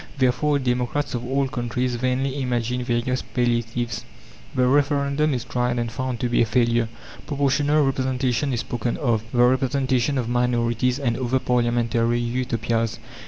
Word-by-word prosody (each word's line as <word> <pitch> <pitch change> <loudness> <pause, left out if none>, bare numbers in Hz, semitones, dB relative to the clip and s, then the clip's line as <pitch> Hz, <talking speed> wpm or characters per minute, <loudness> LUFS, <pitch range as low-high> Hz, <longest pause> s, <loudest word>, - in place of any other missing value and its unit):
Therefore 140 +3 +2
democrats 125 +2 -1
of 120 -1 -3
all 135 +2 0
countries 125 0 -2
vainly 130 +3 -1
imagine 125 -1 -1
various 120 +1 0
palliatives. 120 -1 -1 0.5
The 125 - +3
Referendum 140 +2 +2
is 120 - -3
tried 125 0 -1
and 120 -1 -2
found 130 -1 -3
to 125 - +1
be 120 - +2
a - - +4
failure; 115 0 +2 0.4
proportional 145 +1 +2
representation 130 0 0
is 120 -2 -1
spoken 120 0 -3
of, 115 -6 0
the 120 -1 +4
representation 130 +1 +2
of 125 -3 -1
minorities, 120 0 +1
and 120 -5 0
other 130 +1 0
parliamentary 120 -1 +1
Utopias. 115 -2 -1
125 Hz, 145 wpm, -23 LUFS, 120-130 Hz, 0.5 s, a